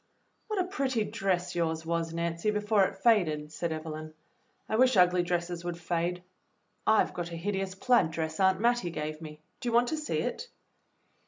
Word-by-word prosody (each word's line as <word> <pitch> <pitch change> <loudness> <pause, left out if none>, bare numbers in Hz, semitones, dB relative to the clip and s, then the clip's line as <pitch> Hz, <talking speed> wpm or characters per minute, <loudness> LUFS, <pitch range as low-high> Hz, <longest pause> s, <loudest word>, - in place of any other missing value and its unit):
"What 430 -3 -2
a - - +3
pretty 275 - -1
dress 185 -3 -1
yours 160 -1 -1
was, 165 0 -1
Nancy, 170 +3 -1
before 210 -1 +3
it 195 - -4
faded," 175 -9 +2
said 170 +1 -3
Evelyn. 155 0 -6 0.5
"I 220 - -1
wish 255 -1 +4
ugly 180 0 +5
dresses 175 0 -2
would 175 -1 -4
fade. 175 +1 -2 0.6
I've 220 0 +4
got 175 -1 -4
a - - -5
hideous 195 +1 -2
plaid 240 -5 +3
dress 160 0 -3
Aunt 190 -1 +4
Mattie 240 -4 +2
gave 155 -1 -5
me. 155 -1 -9 0.2
Do 245 - -2
you - - -3
want 240 +1 +4
to 315 - -1
see 305 -1 -2
it. - - -3
180 Hz, 180 wpm, -29 LUFS, 165-215 Hz, 0.6 s, ugly